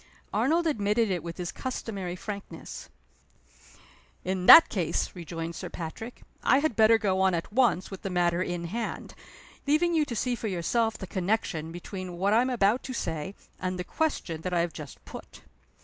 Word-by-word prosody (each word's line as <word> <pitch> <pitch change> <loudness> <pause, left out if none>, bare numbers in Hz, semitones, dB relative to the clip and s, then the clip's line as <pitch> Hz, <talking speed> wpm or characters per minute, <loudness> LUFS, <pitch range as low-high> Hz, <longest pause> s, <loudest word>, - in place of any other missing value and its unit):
Arnold 330 +5 +2
admitted 220 -6 +1
it 180 -3 -1
with 170 +1 -7
his 175 -2 -4
customary 200 -8 -4
frankness. 200 +1 -8 1.4
"In 185 0 -2
that 330 - +11
case," 170 -5 -1
rejoined 165 -1 -5
Sir - - -6
Patrick, 180 +8 -7 0.2
"I 260 - +4
had 285 -4 +1
better 220 +1 +6
go 190 -4 0
on 190 -2 +3
at 170 +4 -4
once 230 -8 +2
with 195 - -7
the 195 - -4
matter 175 -1 +1
in 175 -2 -2
hand 220 +7 -4 0.5
leaving 325 +4 +3
you 315 -2 +3
to 240 - -5
see 250 +3 0
for 230 -2 -3
yourself 220 +5 0
the 190 - -6
connection 180 -4 -1
between 180 +1 -7
what 200 +3 +2
I 230 - +5
am 255 - 0
about 230 -1 +2
to 260 - -5
say, 165 -3 -3 0.2
and 185 0 -2
the 180 - -3
question 180 - -2
that 180 +1 -2
I 170 - +3
have 170 -1 -2
just 150 -3 -10
put. - - -11
190 Hz, 180 wpm, -28 LUFS, 175-230 Hz, 1.4 s, that